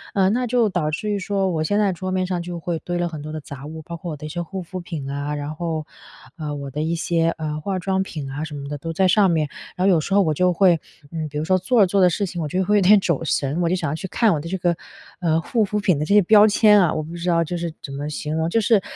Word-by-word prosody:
呃， 190 -1 +4
那 250 +2 0
就 235 -2 +3
导 175 -5 -1
致 210 +7 -2
于 205 - 0
说 195 0 0
我 155 -2 -1
现 205 +6 0
在 205 -2 +3
桌 185 +2 -5
面 185 0 0
上 180 -1 -2
就 175 0 -6
会 165 -1 -3
堆 175 0 -4
了 175 0 0
很 160 -3 -7
多 155 +1 -7
的 155 - -4
杂 140 -1 -9
物， 160 0 -8
包 170 +2 -7
括 170 +1 -6
我 150 - -6
的 150 - -9
一 155 - -5
些 175 - -3
护 185 +2 -6
肤 185 +2 -7
品 165 -6 -6
啊， 145 +1 -3
然 145 +1 -4
后， 160 -2 -3 0.5
呃， 150 -2 -4
我 140 -1 -6
的 150 +3 -3
一 165 +2 0
些， 165 0 +1
呃， 155 -1 -3
化 190 +4 -2
妆 190 +1 0
品 155 -7 -5
啊 145 +3 -4
什 150 - -8
么 140 -1 -6
的 145 - -4
都 165 +2 -5
在 190 +3 +3
上 195 +1 +4
面。 155 -3 +1 0.3
然 185 - 0
后 - - +6
有 165 - +3
时 195 - -3
候 200 - +6
我 155 - +1
就 180 +4 +2
会， 175 -2 +4 0.3
嗯， 160 -2 -3
比 150 - -6
如 150 - -1
说 185 +1 +3
做 225 +4 +3
着 - - +7
做 195 +1 +2
着 180 - +6
事 200 +4 -1
情 175 -2 -5
我 155 - -2
就 185 +6 0
会 210 +2 +3
有 205 - +4
点 205 +3 +7
走 170 -5 -1
神， 145 +3 0
我 170 - +1
就 180 - +2
想 160 -6 -2
要 155 - -2
去 190 - -5
看 215 +5 +2
我 155 - -1
的 155 - -7
这 190 - -2
个， 175 -1 +1 0.4
呃， 165 -3 +2
护 225 +5 +1
肤 210 +1 -1
品 185 -8 +2
的 150 - -1
这 200 - +2
些 210 - +8
标 210 +2 +7
签 210 -1 +5
啊。 170 - +3
我 155 - -2
不 160 +3 -9
知 175 +1 -3
道 165 -1 +3
就 175 +2 -4
是 170 -1 -3
怎 140 - -7
么 145 +2 -4
形 150 +1 -4
容， 160 +1 0
就 225 - +2
是 215 -2 +3
170 Hz, 340 characters per minute, -22 LUFS, 155-190 Hz, 0.5 s, 些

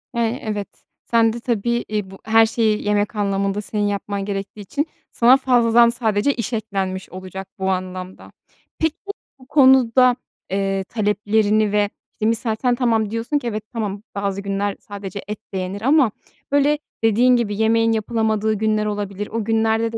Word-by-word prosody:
Eee, 235 +2 0
evet. 210 -2 -3 0.4
Sen 230 -1 +4
de 235 - -5
tabii, 235 0 -1
i 205 -3 -2
bu 195 - -11
her 225 +1 +5
şeyi 220 -1 0
yemek 210 +1 +1
anlamında 200 0 0
senin 205 +1 -2
yapman 200 0 -3
gerektiği 200 +1 -5
için 285 - -2 0.2
sana 245 +3 +5
fazladan 240 -3 +4
sadece 235 +1 +1
iş 235 -1 -4
eklenmiş 195 -4 -3
olacak 185 +1 -8
bu 190 - 0
anlamda. 185 0 -5 0.5
Peki, 320 -1 +1 0.4
bu 255 - -17
konuda, 260 -3 +5 0.3
eee, 195 0 -1
taleplerini 210 0 +1
ve, 205 0 +2 0.2
işte, 215 - -4
misal 225 0 0
sen 250 -2 +2
tamam, 225 -4 +1
diyorsun 230 +6 -1
ki 245 - -6
"Evet, 215 -2 -3
tamam, 210 -2 -3
bazı 200 -1 -2
günler 200 0 -2
sadece 200 -1 -7
et 210 0 -5
de - - -2
yenir." 185 +2 -4
ama, 270 -3 +4 0.4
böyle, 285 +1 +3 0.3
dediğin 240 +3 +4
gibi 215 -4 0
yemeğin 225 +1 +3
yapılamadığı 220 -1 0
günler 215 0 0
olabilir. 205 -1 -3
O 225 -1 -3
günlerde 225 0 +1
de 225 - -3
215 Hz, 160 wpm, -21 LUFS, 200-235 Hz, 0.5 s, her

